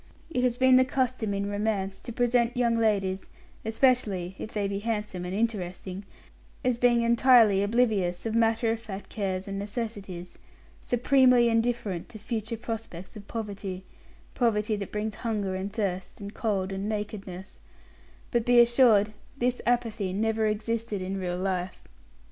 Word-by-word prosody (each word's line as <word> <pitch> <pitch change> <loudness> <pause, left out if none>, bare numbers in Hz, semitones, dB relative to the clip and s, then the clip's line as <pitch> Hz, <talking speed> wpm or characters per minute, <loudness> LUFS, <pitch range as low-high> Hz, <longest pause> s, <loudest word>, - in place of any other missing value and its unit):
It 250 - 0
has 245 -1 +1
been 260 0 +6
the 260 - +6
custom 255 -4 -1
in 200 0 -1
romance 205 -2 -2
to - - -7
present 245 +1 +1
young 235 -2 +2
ladies, 200 -4 0 0.3
especially 220 -6 +1
if 215 - -6
they 205 -2 -1
be 195 0 -2
handsome 210 -4 -3
and 180 +1 -4
interesting, 195 -3 -3 0.6
as 250 -2 +1
being 240 -1 +4
entirely 235 -4 +5
oblivious 205 -5 +1
of 225 - -1
matter 225 0 +2
of 225 - -2
fact 205 -3 -8
cares 190 -3 -3
and 195 0 -4
necessities, 200 -4 -6 0.4
supremely 250 -1 +4
indifferent 225 -6 -1
to - - -9
future 225 +1 -4
prospects 220 -5 -6
of 205 -1 -10
poverty 200 -4 -5 0.5
poverty 215 -3 +1
that 200 -2 -5
brings 210 +1 -2
hunger 210 -5 -1
and 190 +2 -3
thirst 190 -4 -3
and 200 0 -7
cold 195 -4 -1
and 195 +2 -3
nakedness; 200 -3 -5 0.7
but, 235 -2 +2
be 245 +1 +5
assured, 235 -3 +5 0.2
this 250 -1 0
apathy 225 -5 0
never 220 +2 +1
existed 220 0 -2
in 190 +1 -3
real 180 -1 -2
life. 185 -1 -3
215 Hz, 150 wpm, -27 LUFS, 195-235 Hz, 0.7 s, been